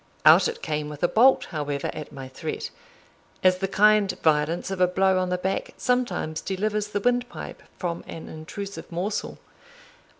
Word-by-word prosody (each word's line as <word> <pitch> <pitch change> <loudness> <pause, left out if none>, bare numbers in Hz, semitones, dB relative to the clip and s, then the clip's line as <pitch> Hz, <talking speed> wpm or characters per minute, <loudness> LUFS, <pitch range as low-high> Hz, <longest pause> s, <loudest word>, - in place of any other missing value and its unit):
Out - - +8
it 465 - -6
came 150 -1 -2
with 150 +1 -8
a - - +6
bolt, 250 +8 +5
however, 145 -3 -2
at 150 -1 -7
my 135 -2 -8
threat; 130 - -5 0.7
as 185 0 +4
the 195 - 0
kind 210 0 +4
violence 160 +4 +2
of 190 -1 -3
a 180 - +6
blow 190 +1 +2
on 185 0 -1
the 180 - 0
back 190 +2 -3
sometimes 245 -11 -1
delivers 210 +2 -1
the 205 -1 -2
windpipe 245 +3 -2 0.2
from 170 -2 -3
an 165 - -8
intrusive 195 +7 -7
morsel. 185 +5 -3
185 Hz, 165 wpm, -25 LUFS, 155-210 Hz, 0.7 s, Out